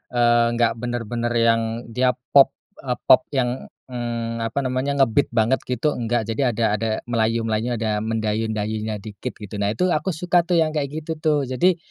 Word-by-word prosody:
eee, 120 -1 +4
nggak 115 -1 +1
bener-bener 120 0 -2
yang 115 0 +3 0.3
dia 125 +1 +2 0.2
pop, 140 -1 +6 0.2
eee, 125 -2 -2
pop 130 - +7
yang, 125 -1 -1 0.2
eee, 115 -1 -3
apa 115 +4 -2
namanya, 135 +2 +1
nge-beat 135 +4 +1
banget 115 +3 +1
gitu, 125 +5 0
nggak. 120 -1 -1
Jadi 115 +5 -2
ada 120 -3 +1
ada 110 +1 -1 0.2
Melayu, 115 -1 0
Melayunya, 115 +2 -1
ada 110 -1 -1
mendayu-dayunya 110 -1 -2
dikit 105 0 -7
gitu. 105 -1 -8
Nah, 100 - +1
itu 180 - +2
aku 155 +5 -1
suka 175 +1 +2
tuh 175 0 0
yang 160 -1 +2
kayak 145 -2 -1 0.2
gitu 160 - -2
tuh. 150 -3 +2
Jadi, 170 +8 +2
120 Hz, 175 wpm, -22 LUFS, 110-130 Hz, 0.3 s, pop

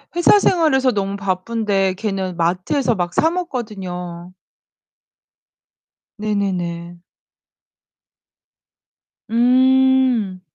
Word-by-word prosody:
회사 350 +4 +5
생활에서 270 -9 +2
너무 200 -2 -2
바쁜데 195 0 -1
걔는 190 -4 -3
마트에서 185 - 0
막 175 -1 -3
사먹거든요. 195 - -3 1.9
네네네. 180 -5 -3 2.3
음. 255 -4 +3
205 Hz, 155 characters per minute, -19 LUFS, 185-260 Hz, 2.3 s, 회사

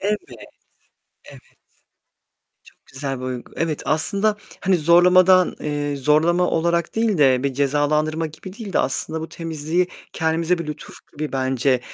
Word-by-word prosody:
Evet. 210 +2 0 1.1
Evet. - - -13 1.2
Çok - - -22
güzel 135 -1 -4
bir 130 - -5
uygu 125 -1 -6
Evet, 160 -3 -2
aslında, 200 +8 +1 0.2
hani, 190 -1 +2
zorlamadan, 180 +3 +5
eee, 145 -1 -2
zorlama 155 +6 +2
olarak 170 0 0
değil 220 -4 +1
de, 130 -3 +4
bir 140 -1 -1
cezalandırma 150 +3 0
gibi 160 +4 -10
değil 210 -5 -7
de - - +2
aslında 155 +5 -2
bu 160 - -6
temizliği 165 +2 -2 0.3
kendimize 165 +2 0
bir 170 -2 -6
lütuf 150 0 -8 0.2
gibi 150 -2 -5
bence, 130 0 +1
155 Hz, 140 wpm, -21 LUFS, 145-175 Hz, 1.2 s, zorlamadan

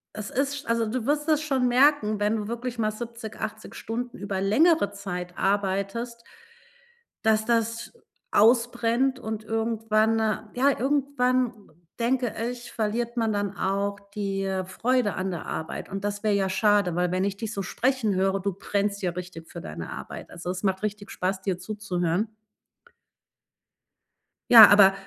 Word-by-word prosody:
Es 215 -1 -5
ist 275 +2 -1
sch - - -12
also, 230 -1 +1
du 235 +2 -3
wirst 295 +1 +1
das 310 -2 +3
schon 270 -5 +1
merken, 245 -4 +3
wenn 210 +2 +1
du 210 -1 -4
wirklich 240 +1 -4
mal 215 -2 +1
70, 230 0 -7
80 220 0 -6
Stunden 240 +2 -5
über 195 -1 -3
längere 275 - +3
Zeit 180 -3 -6
arbeitest 200 +4 -1 1.0
dass 220 0 +3
das 230 0 0 0.4
ausbrennt 240 +3 +3
und 220 -2 -5
irgendwann 225 0 +1 0.4
ja, 275 +3 +3
irgendwann 255 -2 +1 0.5
denke 245 0 0 0.2
ich, 245 -1 -8
verliert 235 +2 -2
man 225 -2 +1
dann 205 -1 -2
auch 200 +1 -1 0.2
die 195 -2 -2 0.2
Freude 230 +3 0
an 190 - -2
der 175 - -5
Arbeit. 160 - -5
Und 195 0 -5
das 205 +1 -3
wäre 215 - +2
ja 195 -1 +1
schade, 205 -3 +2
weil 180 0 +1
wenn 185 +1 0
ich 200 0 -2
dich 225 0 -4
so 200 - -3
sprechen 235 +1 0
höre, 195 +1 +1
du 200 +1 -1
brennst 200 +2 -2
ja 180 - +1
richtig 175 -2 -8
für - - -8
deine 80 +1 -7
Arbeit. - - -8
Also, 175 +1 -7
es 185 +1 -4
macht 190 0 0
richtig 210 -1 -4
Spaß, 190 +1 -2
dir 185 -2 -2
zuzuhören. 200 0 -2 2.2
Ja, 225 -3 +12
aber 200 -1 +7
215 Hz, 160 wpm, -26 LUFS, 195-240 Hz, 2.2 s, Ja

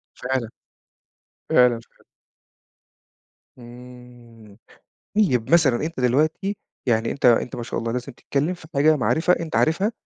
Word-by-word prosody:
فعلًا، 125 -3 -3 1.0
فعلًا 125 -1 +5
اشتغل 115 - -19 1.5
امم 120 -3 -14 0.6
طيب 130 - +1
مثلًا 150 -8 +4
أنت 165 -4 -6
دلوقتي، 155 - 0 0.3
يعني 115 -2 +1
أنت 140 - -3
أنت 120 0 +3
ما 120 - -5
شاء - - -4
الله 115 0 -3
لازم 125 +3 -4
تتكلم 145 +7 -2
في 175 -3 -13
حاجة 155 +3 +4
معرفة 160 +6 +2
أنت 165 -2 -5
عارفها، 190 +7 +2
125 Hz, 125 wpm, -22 LUFS, 120-155 Hz, 1.5 s, فعلًا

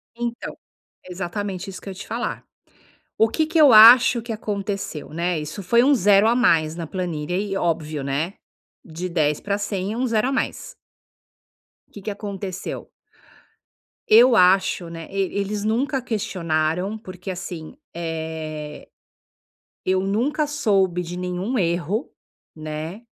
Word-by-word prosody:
Então. 235 0 -4 0.5
Exatamente 185 +1 -5
isso 190 - -9
que - - -8
eu - - -4
ia - - -9
te - - -8
falar. 235 +2 -3 0.7
O 220 - +5
que 315 +7 +1
que 325 +1 +1
eu 295 -4 +8
acho 235 +2 +9
que 230 +1 -7
aconteceu 200 -6 -4
né, 170 0 -1
isso 155 +6 -6
foi 235 +6 +4
um 285 +3 +5
0 205 -1 +5
a 235 - +3
mais 165 -10 +3
na 170 -1 -5
planilha 175 -1 -3
e 200 0 -2
óbvio, 155 -5 -1
né. 145 +7 -2 0.5
De 170 +2 -5
10 150 -4 +1
pra 200 0 -2
100 200 -1 -3
é - - -5
um 255 - 0
0 225 0 +1
a - - -2
mais. - - -3 1.2
Que 205 - -10
que 210 - -3
aconteceu? 200 -2 -6 1.2
Eu 235 +2 +7
acho 185 -2 +3
né, 165 -1 -8
e 195 -1 -1
eles 200 +1 -2
nunca 255 +5 0
questionaram 185 -4 -1
porque, 185 -3 -9
assim, 175 0 -7 0.2
eh, 160 -2 -5 1.0
eu 185 0 +2
nunca 235 +11 0
soube 195 - +1
de 175 +1 -7
nenhum 180 +7 -2
erro, 175 - -1 0.4
né, 155 +6 -6
190 Hz, 145 wpm, -22 LUFS, 170-220 Hz, 1.2 s, acho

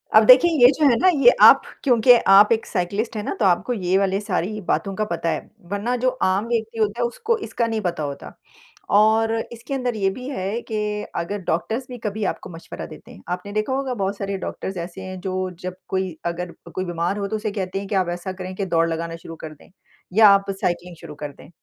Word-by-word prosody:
अब 215 - +8
देखिए, 260 +9 +8
ये - - +12
जो 305 - +3
है 240 - +4
ना - - +4 0.2
ये - - +9
आप - - +9 0.2
क्योंकि 245 -2 +5 0.2
आप 205 +3 +7
एक 225 -1 +2
साइकिलिस्ट 200 +5 -2
हैं 210 - -3
ना - - -3
तो 210 - +2
आपको 190 +7 +2
ये 185 -4 +1
वाली 195 0 +1
सारी 205 +1 -2
बातों 195 -2 0
का 215 - -1
पता 170 0 -1
है। - - -5 0.2
वरना 210 +5 -1
जो 255 - +4 0.2
आम 195 +4 0
व्यक्ति 225 -1 -2
होता 215 +2 0
है - - +2
उसको 450 - -1
इसका 230 +1 -1
नहीं 225 -1 -2
पता 175 -5 -2
होता 140 -1 -6 0.7
और 220 +1 +3 0.2
इसके 235 +3 -7
अंदर 250 -3 -1
ये 195 -2 +1
भी 250 +6 -7
है 210 -2 -3
कि 215 - -1 0.4
अगर 195 +4 -3
डॉक्टर्स 220 +10 -1
भी 250 - -7
कभी 210 +1 -3
आपको - - -4
मशवरा 165 -1 -8
देते - - -13
हैं। - - -14
आपने 180 +3 -4
देखा 215 +5 -1
होगा 265 -1 -1
बहुत 200 -3 -2
सारे 200 -1 -3
डॉक्टर्स 190 0 -5
ऐसे 185 +2 -10
हैं 185 0 -7
जो 185 0 -2
जब 185 0 -5
कोई 190 -3 -2
अगर 170 +1 -3 0.2
कोई 185 - -3
बीमार 175 +2 -2
हो 200 -1 -2
तो 220 - -3
उसे 215 0 -3
कहते 195 -2 -3
हैं 200 - -7
कि 205 - -2
आप 185 -2 +1
ऐसा 175 +2 -5
करें 185 0 -7
कि 195 - -2
दौड़ 165 -2 +2
लगाना 165 0 -3
शुरू 165 0 -10
कर 155 - -8
दें, 150 - -20 0.4
या 215 +1 +7
आप 200 0 +3
साइकिलिंग 175 0 -2
शुरू 160 -3 -9
कर 145 0 -6
दें। 140 - -16
200 Hz, 235 wpm, -22 LUFS, 180-225 Hz, 0.7 s, ये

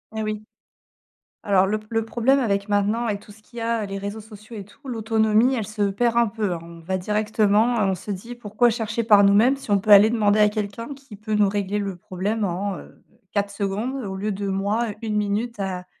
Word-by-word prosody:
Et 220 - -2
oui. 215 0 -3 1.0
Alors 195 -2 +3
le 215 +2 0
p 215 - -17
le 225 -1 0
problème 245 +4 +2
avec 200 -4 0
maintenant, 205 +3 +1
avec 205 -2 -2
tout 205 - -15
ce 215 +1 -20
qu'il 235 +2 -13
y - - -3
a, 230 -2 -1
les 195 - -5
réseaux 205 +2 -5
sociaux 215 +1 -12
et 200 - -7
tout, 270 +8 -20
l'autonomie, 220 +1 +2
elle 225 -4 -2
se 215 -1 -4
perd 235 +4 0
un 235 - +4
peu, 210 -3 -2
hein. 170 - -3
On 170 0 -12
va 185 +3 -2
directement, 215 +3 +1
heu, - - +3
on - - 0
se 195 +3 -8
dit: 215 +5 -6
«Pourquoi 240 +1 +1
chercher 225 0 -2
par 205 -2 +6
nous-mêmes 220 +7 +5
si 270 - -10
on 200 - +4
peut 210 - -3
aller 205 +2 +8
demander 215 -2 +2
à 210 - +6
quelqu'un 210 +5 -4
qui 270 -6 -13
peut 215 +1 -4
nous 210 -1 +4
régler 205 0 -1
le 195 -2 -3
problème 195 +5 -3
en, 190 +1 -2
heu, - - -15 0.3
4 200 -1 0
secondes 200 +5 -3
au 190 -1 -5
lieu 210 +2 -2
de 200 0 -4
moi 205 +5 0
1 215 -2 -2
minute 210 +3 -1
à 180 -2 -4
210 Hz, 235 wpm, -23 LUFS, 200-225 Hz, 1.0 s, aller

